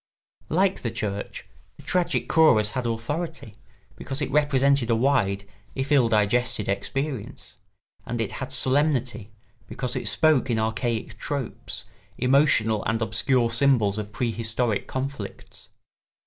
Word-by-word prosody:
Like 190 +4 +2
the 120 - -2
church, 100 -2 -4 0.3
the - - -14
tragic 180 -1 0
chorus 110 -10 +4
had 125 0 -2
authority, 120 +2 -4 0.4
because 135 +2 -5
it 145 - -2
represented 140 -3 +3
a 115 - +4
wide, 100 -6 +1 0.3
if 135 +2 -3
ill 130 -5 +5
digested, 110 +1 +1
experience; 130 +5 -4 0.5
and 120 0 -4
it 115 - -1
had 130 0 -4
solemnity, 130 -4 +1 0.4
because 125 -2 -4
it 115 - -3
spoke 135 +5 +3
in 115 - +1
archaic 110 0 -2
tropes, 140 -4 -5 0.3
emotional 125 -5 +3
and 110 0 0
obscure 120 +1 +1
symbols 115 -5 +2
of 105 0 -6
prehistoric 115 -1 -1
conflicts. 130 -6 -6
120 Hz, 125 wpm, -25 LUFS, 110-140 Hz, 0.5 s, ill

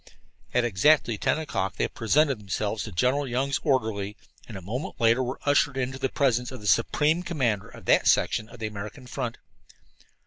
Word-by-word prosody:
At 125 - +2
exactly 120 +3 +3
ten - - +1
o'clock 95 - -3
they - - 0
presented 135 +2 +1
themselves 105 +1 -2
to 110 - -7
General 130 +10 +1
Young's 135 +3 0
orderly, 110 -7 0 0.3
and 110 - -8
a - - -6
moment 120 - -5
later 115 +2 +4
were 130 +1 -3
ushered 145 -1 +2
into 130 0 -2
the 135 0 0
presence 125 -3 +1
of 130 - -8
the 105 - -11
supreme 150 - +2
commander 130 - -1
of - - -13
that - - +4
section 110 +1 +2
of 120 - -12
the 110 - -4
American 105 +5 -7
front. 125 -2 -4
125 Hz, 180 wpm, -26 LUFS, 110-135 Hz, 0.3 s, later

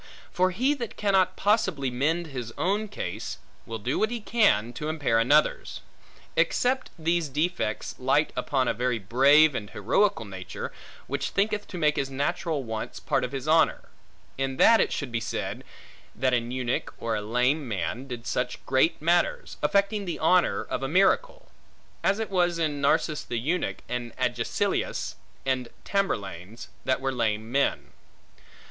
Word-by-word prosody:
For 185 0 +2
he 255 +10 +1
that 240 -6 -6
cannot 190 -3 +2
possibly 190 - +1
mend 155 +7 0
his 125 -6 -6
own 205 +4 0
case, 105 - -5 0.3
will 115 - -4
do 125 +6 -2
what 215 - +2
he 240 0 -3
can, 205 - +2
to 150 +5 -4
impair 145 -8 +1
another's; 145 +7 +2 0.5
except 255 +1 +1
these 165 -1 0
defects 140 -7 -1
light 135 +4 +2
upon 130 -3 0
a - - +2
very 125 +1 0
brave, 135 +9 +5
and 105 -4 -4
heroical 120 - +1
nature, 95 -2 -6 0.3
which - - -2
thinketh 205 +1 0
to 180 - -7
make 150 -3 +2
his 135 - -1
natural 150 +2 -1
wants 110 -2 -5
part - - 0
of 125 - -3
his 135 +1 -5
honor; 160 +1 +3 0.5
in 135 -1 -1
that 230 - +6
it - - +1
should 145 -4 -3
be 115 - 0
said, - - -4 0.5
that 130 +1 +1
an 120 -1 0
eunuch, 125 -1 -2
or 115 -1 -2
a 105 - -2
lame 125 +7 +1
man, 115 +5 -3
did 120 -2 -7
such 125 0 -2
great 130 +5 +2
matters; 175 - +1
affecting 200 0 +1
the 175 - -3
honor 180 +3 +3
of - - -4
a 135 - -1
miracle; 195 - +2 0.5
as 200 - +3
it 220 -2 -4
was 175 -2 +2
in 150 -4 -1
Narses 150 +2 +1
the 120 - -4
eunuch, 155 +10 -2
and 120 -1 -4
Agesilaus - - -1 0.3
and 130 -2 -1 0.2
Tamberlanes, 105 - -3 0.2
that 130 +1 +1
were 135 0 0
lame 110 -2 -1
men. 140 +2 0
140 Hz, 160 wpm, -27 LUFS, 120-180 Hz, 0.5 s, that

